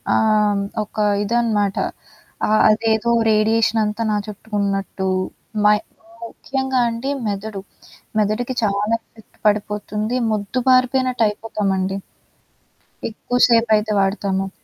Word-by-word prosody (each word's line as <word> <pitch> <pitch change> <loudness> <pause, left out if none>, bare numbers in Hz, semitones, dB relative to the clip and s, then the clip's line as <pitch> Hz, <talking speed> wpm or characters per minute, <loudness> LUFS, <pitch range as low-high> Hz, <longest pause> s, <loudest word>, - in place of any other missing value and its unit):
ఆహ్, 210 -2 +2 0.2
ఒక 210 - -16 0.3
ఇదనమాట. 210 -3 +1 0.7
ఆహ్, 215 0 +3
అదేదో 220 +1 +2 0.2
రేడియేషనంతా 220 0 +2
నా 210 - +1
చుట్టూ 210 +1 -10
ఉన్నట్టు, 195 -1 -2 0.6
మై 210 0 +6 0.5
ముఖ్యంగా 265 +2 -2
అండి 235 +5 -3 0.2
మెదడు. 200 0 -4 0.6
మెదడుకి 215 +5 0
చాలా 205 +2 +1
ఎఫెక్ట్ 220 -2 -22
పడిపోతుంది. 210 +2 -1 0.2
మొద్దుబారిపోయినటైపోతామండి. 225 -4 +1 1.1
ఎక్కువ 245 +3 -4
సేపయితే 220 -2 +3
వాడతము. 195 -1 0
215 Hz, 85 wpm, -20 LUFS, 205-230 Hz, 1.1 s, మై